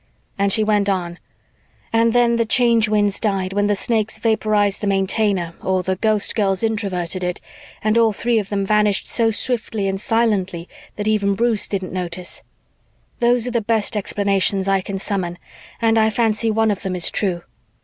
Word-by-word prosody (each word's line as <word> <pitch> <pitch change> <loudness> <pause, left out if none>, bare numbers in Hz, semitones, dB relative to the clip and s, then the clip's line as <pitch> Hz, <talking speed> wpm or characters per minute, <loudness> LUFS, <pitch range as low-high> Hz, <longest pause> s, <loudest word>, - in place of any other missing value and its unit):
And 200 0 +1
she 215 +2 +4
went 210 -1 +1
on, 175 -3 -2 0.7
"And 230 0 +3
then 235 0 +3
the 230 - +2
Change 230 -1 +3
Winds 205 -2 +2
died 195 -3 -1
when 205 +1 +1
the 205 - +2
Snakes 220 +1 0
vaporized 215 -3 +1
the 205 - -2
Maintainer 195 -2 0
or 185 -1 0
the 190 +1 -1
Ghostgirls 205 -1 0
Introverted 190 -5 -2
it 180 0 -2 0.4
and 215 +2 +2
all 225 -1 +4
three 230 +2 0
of 200 -2 -5
them 200 -1 -1
vanished 210 -1 +1
so 230 -2 +2
swiftly 225 -3 -2
and 195 0 -2
silently 195 -7 0 0.3
that 210 0 -3
even 200 -2 +1
Bruce 230 -1 0
didn't 190 -3 -4
notice 180 -1 -4 0.8
those 240 -1 +2
are - - -2
the 235 -1 0
best 220 0 -1
explanations 200 -1 0
I 195 -1 +2
can 195 +1 -5
summon 190 -3 -2 0.4
and 225 -1 +3
I 220 0 +3
fancy 225 0 +1
one 220 0 +2
of 200 - -3
them 190 -1 -3
is 175 - 0
true. 180 -4 -1
205 Hz, 175 wpm, -20 LUFS, 195-225 Hz, 0.8 s, she